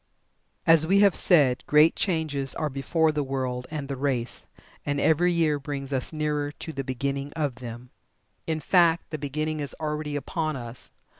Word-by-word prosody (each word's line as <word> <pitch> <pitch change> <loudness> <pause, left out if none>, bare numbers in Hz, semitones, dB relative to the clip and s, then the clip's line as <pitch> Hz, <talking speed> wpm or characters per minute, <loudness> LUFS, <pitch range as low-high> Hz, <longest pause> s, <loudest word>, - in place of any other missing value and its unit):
As 165 -3 +6
we 195 +5 +3
have 200 -3 +5
said, 140 -8 +4
great 150 +2 +5
changes 155 -7 -1
are 155 -2 -2
before 155 +4 +1
the 150 -1 -1
world 130 -2 -3
and 150 -3 -5
the 140 - -3
race, 130 -3 -2 0.4
and 145 0 -1
every 170 +4 +3
year 160 -4 +1
brings 140 -1 -5
us 130 -2 -1
nearer 150 -2 -1
to 160 - -7
the 135 - -3
beginning 140 +2 -3
of 145 -7 -2
them. 120 0 -9 0.6
In 160 -1 -1
fact, 170 +1 +3
the 155 - -4
beginning 155 +2 -2
is 145 -2 -3
already 150 -1 -3
upon 155 +2 -2
us. 120 -1 -7
145 Hz, 170 wpm, -26 LUFS, 135-160 Hz, 0.6 s, As